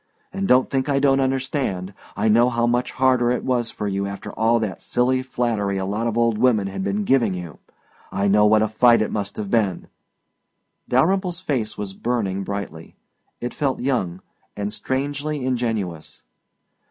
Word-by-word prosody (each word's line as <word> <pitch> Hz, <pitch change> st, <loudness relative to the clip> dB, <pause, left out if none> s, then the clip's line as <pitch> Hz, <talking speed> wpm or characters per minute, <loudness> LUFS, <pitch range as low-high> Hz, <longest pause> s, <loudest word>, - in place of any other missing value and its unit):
And 195 Hz, 0 st, -2 dB
don't 125 Hz, +1 st, +4 dB
think 135 Hz, +1 st, 0 dB
I 140 Hz, -, +2 dB
don't 135 Hz, -1 st, +3 dB
understand. 130 Hz, -, -1 dB, 0.2 s
I 105 Hz, +2 st, +1 dB
know 120 Hz, +3 st, +5 dB
how 120 Hz, -1 st, +1 dB
much 120 Hz, +1 st, 0 dB
harder 130 Hz, -2 st, +3 dB
it 125 Hz, -, 0 dB
was 120 Hz, -2 st, 0 dB
for 105 Hz, -, -4 dB
you 100 Hz, 0 st, -1 dB
after 100 Hz, 0 st, -7 dB
all 115 Hz, +1 st, +2 dB
that 110 Hz, -4 st, -3 dB
silly 130 Hz, +1 st, +1 dB
flattery 115 Hz, -6 st, -1 dB
a 95 Hz, -, -2 dB
lot 105 Hz, +4 st, -1 dB
of 115 Hz, 0 st, -2 dB
old 115 Hz, -2 st, +2 dB
women 115 Hz, -6 st, +3 dB
had 95 Hz, -, -4 dB
been 205 Hz, +1 st, -1 dB
giving 120 Hz, -, +2 dB
you. 85 Hz, -5 st, -8 dB, 0.5 s
I 100 Hz, +1 st, 0 dB
know 105 Hz, +1 st, +5 dB
what 110 Hz, 0 st, +4 dB
a -, -, +2 dB
fight 115 Hz, +2 st, +4 dB
it -, -, -4 dB
must 100 Hz, -1 st, -3 dB
have 105 Hz, -2 st, -4 dB
been 105 Hz, -6 st, 0 dB, 0.5 s
" -, -, -41 dB
Dalyrimple's 180 Hz, +7 st, +2 dB
face 130 Hz, -12 st, -2 dB
was 100 Hz, -2 st, -5 dB
burning 100 Hz, -4 st, -2 dB
brightly. 95 Hz, -6 st, -6 dB, 0.4 s
It 120 Hz, -, -4 dB
felt 135 Hz, -3 st, -1 dB
young 95 Hz, -9 st, -1 dB, 0.4 s
and 105 Hz, 0 st, -3 dB
strangely 145 Hz, +3 st, -2 dB
ingenuous. 110 Hz, -10 st, -3 dB
115 Hz, 175 wpm, -22 LUFS, 100-130 Hz, 0.5 s, know